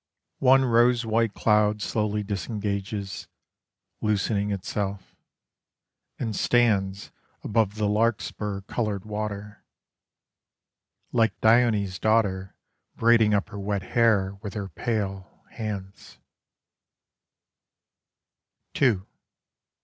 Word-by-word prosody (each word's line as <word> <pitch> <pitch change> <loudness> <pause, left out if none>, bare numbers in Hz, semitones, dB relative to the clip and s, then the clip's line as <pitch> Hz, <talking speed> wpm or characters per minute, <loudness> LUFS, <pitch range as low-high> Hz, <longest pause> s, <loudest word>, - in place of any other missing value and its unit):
One 135 0 +5
rose 120 0 +3
white 115 -1 +1
cloud 105 -1 +2
slowly 105 -1 -1
disengages, 100 0 -4 0.7
loosening 105 -1 0
itself, 100 0 -4 1.0
And 110 -3 -3
stands 100 -5 +1 0.3
Above 105 -2 +1
the 105 -1 0
larkspur 105 -2 -1
coloured 105 -1 -3
water: 105 -1 -5 1.5
Like 115 -1 +1
Dione's 110 -5 +3
daughter 100 -4 +1 0.4
Braiding 115 -2 +4
up 100 - -1
her 100 - -7
wet 100 -1 -2
hair 105 -5 +3
with 105 -3 -7
her 100 -2 -4
pale, 100 -5 -4
hands. 100 -4 -7
105 Hz, 80 wpm, -26 LUFS, 100-115 Hz, 1.5 s, One